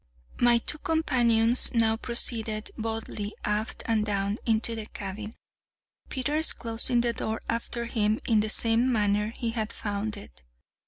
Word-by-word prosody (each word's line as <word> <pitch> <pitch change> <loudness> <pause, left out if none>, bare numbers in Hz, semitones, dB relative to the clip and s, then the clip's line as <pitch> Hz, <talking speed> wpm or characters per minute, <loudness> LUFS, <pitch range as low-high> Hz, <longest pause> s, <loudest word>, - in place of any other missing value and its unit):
My 240 -1 +5
two 300 +6 -1
companions 245 -8 +4
now 225 -1 +3
proceeded 225 -2 -1
boldly 220 -2 -4
aft 210 +2 -3
and 225 -2 +1
down 200 0 -2
into 225 +1 +1
the 220 -2 -6
cabin, 210 +2 -8 0.7
Peters 295 +5 +1
closing 235 +1 +1
the 235 0 0
door 220 0 -4
after 235 0 -3
him 215 -2 0
in 225 -3 +3
the 215 +1 -1
same 230 +3 +2
manner 210 -1 0
he 230 -1 -3
had 225 -1 -4
found 205 +1 -4
it. - - -14
225 Hz, 145 wpm, -26 LUFS, 215-235 Hz, 0.7 s, My